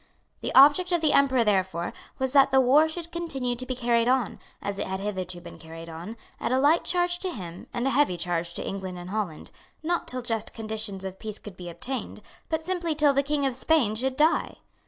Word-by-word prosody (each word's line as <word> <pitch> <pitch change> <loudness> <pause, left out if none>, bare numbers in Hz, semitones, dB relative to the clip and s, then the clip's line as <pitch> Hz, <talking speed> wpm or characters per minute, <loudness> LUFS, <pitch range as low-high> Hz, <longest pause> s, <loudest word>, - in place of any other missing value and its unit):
The - - -3
object 295 +7 +7
of 345 -2 +2
the 310 -2 +3
Emperor 265 -3 +4
therefore 190 -5 0 0.2
was 265 -1 0
that 275 -1 +6
the 265 -1 +4
war 280 +5 +5
should 340 +1 -5
continue 270 -8 -2
to 255 +1 -5
be 255 - -2
carried 235 -1 +2
on, 255 -3 +1 0.2
as 200 0 -4
it - - -2
had 190 0 -3
hitherto 185 -3 -4
been - - -11
carried 165 0 -10
on, 170 +8 -8 0.2
at - - -2
a 255 - +3
light 295 +5 +4
charge 350 0 +1
to 375 - -2
him 180 - -8
and 240 - -2
a 270 - +2
heavy 275 -12 +2
charge 170 0 -2
to - - -4
England 190 -2 -5
and 175 +1 -8
Holland, 200 -7 -4 0.3
not 345 +2 0
till 255 -1 -3
just 225 -2 -3
conditions 215 -3 -4
of 190 0 -6
peace 215 -1 -6
could 205 -3 -11
be 180 -1 -8
obtained, 255 +10 -5 0.3
but 320 0 -2
simply 345 -3 -1
till 295 -2 +4
the 275 - +3
King 285 0 0
of 265 - +1
Spain 260 -4 +2
should 260 +4 -2
die. 310 +2 +2
245 Hz, 220 wpm, -26 LUFS, 190-290 Hz, 0.3 s, object